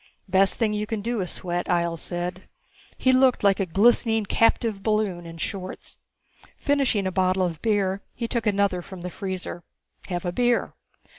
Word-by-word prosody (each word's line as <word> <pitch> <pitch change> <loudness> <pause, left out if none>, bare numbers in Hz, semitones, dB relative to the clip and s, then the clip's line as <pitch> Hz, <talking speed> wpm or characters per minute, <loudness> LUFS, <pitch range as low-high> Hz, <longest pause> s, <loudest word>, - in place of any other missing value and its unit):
"Best 190 +1 +3
thing 220 -3 +1
you 210 0 -2
can 215 -2 -3
do 235 -2 -1
is 180 - -2
sweat." 175 -1 -2
Ihjel 170 -1 +1
said. 180 +2 -4 0.5
He 260 - +3
looked 255 -2 +4
like 200 0 +4
a 195 - 0
glistening 225 +4 +3
captive 225 -1 +2
balloon 200 -5 0
in 165 0 -9
shorts. 185 +2 -6 0.6
Finishing 275 -8 +1
a 190 - 0
bottle 185 0 +2
of 165 -4 -4
beer, 200 -3 +1
he 235 - -3
took 235 -2 -1
another 200 -3 +2
from 185 0 -10
the 180 0 -5
freezer. 185 -3 -5 0.4
"Have 175 -1 -3
a 175 - 0
beer." 240 +5 +1
195 Hz, 170 wpm, -25 LUFS, 180-225 Hz, 0.6 s, looked